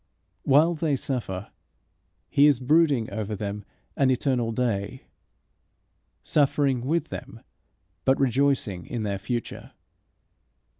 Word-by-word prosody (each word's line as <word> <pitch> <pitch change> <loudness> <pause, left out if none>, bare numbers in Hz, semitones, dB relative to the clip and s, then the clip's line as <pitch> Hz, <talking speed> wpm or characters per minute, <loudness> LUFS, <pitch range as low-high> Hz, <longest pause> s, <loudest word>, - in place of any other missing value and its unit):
While 150 +5 +4
they 155 -3 0
suffer 115 -8 -4 0.8
he 145 0 +5
is 140 -5 +3
brooding 140 -3 +3
over 105 0 -3
them 105 0 -5 0.3
an 135 -2 +2
eternal 125 -2 0
day, 115 0 -2 1.2
suffering 135 -3 +1
with 165 +1 0
them 130 -3 -8 0.6
but 135 - +2
rejoicing 135 -8 +1
in 120 -2 -4
their 100 -2 -2
future. 120 +3 -5
130 Hz, 105 wpm, -25 LUFS, 110-140 Hz, 1.2 s, he